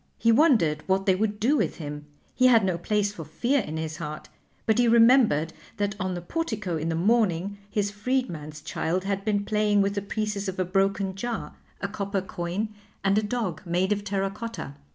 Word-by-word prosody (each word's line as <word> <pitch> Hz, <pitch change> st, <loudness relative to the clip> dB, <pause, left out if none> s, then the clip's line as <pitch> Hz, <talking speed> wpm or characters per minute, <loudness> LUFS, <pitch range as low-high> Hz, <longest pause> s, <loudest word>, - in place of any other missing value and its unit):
He 230 Hz, -, +3 dB
wondered 225 Hz, -, +4 dB
what 190 Hz, 0 st, +1 dB
they 190 Hz, -, +5 dB
would 210 Hz, +2 st, -1 dB
do 250 Hz, +8 st, +3 dB
with -, -, 0 dB
him; 150 Hz, -2 st, -7 dB, 0.3 s
he 255 Hz, -, +4 dB
had 230 Hz, -5 st, +5 dB
no 185 Hz, -2 st, +1 dB
place 205 Hz, +2 st, 0 dB
for 170 Hz, -, -7 dB
fear 235 Hz, -, 0 dB
in 160 Hz, -5 st, -5 dB
his 160 Hz, 0 st, -4 dB
heart, 155 Hz, -3 st, -6 dB, 0.4 s
but 220 Hz, +1 st, +2 dB
he 245 Hz, -, +4 dB
remembered 230 Hz, -, +5 dB, 0.2 s
that 205 Hz, 0 st, 0 dB
on 185 Hz, -2 st, -2 dB
the 175 Hz, -, -6 dB
portico 210 Hz, -, -2 dB
in 160 Hz, +1 st, -2 dB
the 165 Hz, -, 0 dB
morning 200 Hz, 0 st, +1 dB
his 205 Hz, -1 st, 0 dB
freedman's 205 Hz, -, -2 dB
child 180 Hz, +3 st, -1 dB
had 195 Hz, 0 st, -2 dB
been 205 Hz, -1 st, 0 dB
playing 210 Hz, -1 st, +2 dB
with 200 Hz, 0 st, 0 dB
the 200 Hz, -, -2 dB
pieces 205 Hz, -1 st, -2 dB
of 190 Hz, -, -6 dB
a 185 Hz, -, +1 dB
broken 195 Hz, +1 st, +1 dB
jar, 235 Hz, +4 st, -4 dB, 0.3 s
a 200 Hz, -, -1 dB
copper 200 Hz, -1 st, -2 dB
coin, 185 Hz, +4 st, -3 dB, 0.3 s
and 195 Hz, 0 st, +3 dB
a -, -, 0 dB
dog 210 Hz, -6 st, -2 dB
made 180 Hz, +2 st, 0 dB
of 205 Hz, 0 st, 0 dB
terra 195 Hz, -1 st, -1 dB
cotta. 220 Hz, -9 st, -6 dB
200 Hz, 200 wpm, -26 LUFS, 175-215 Hz, 0.4 s, they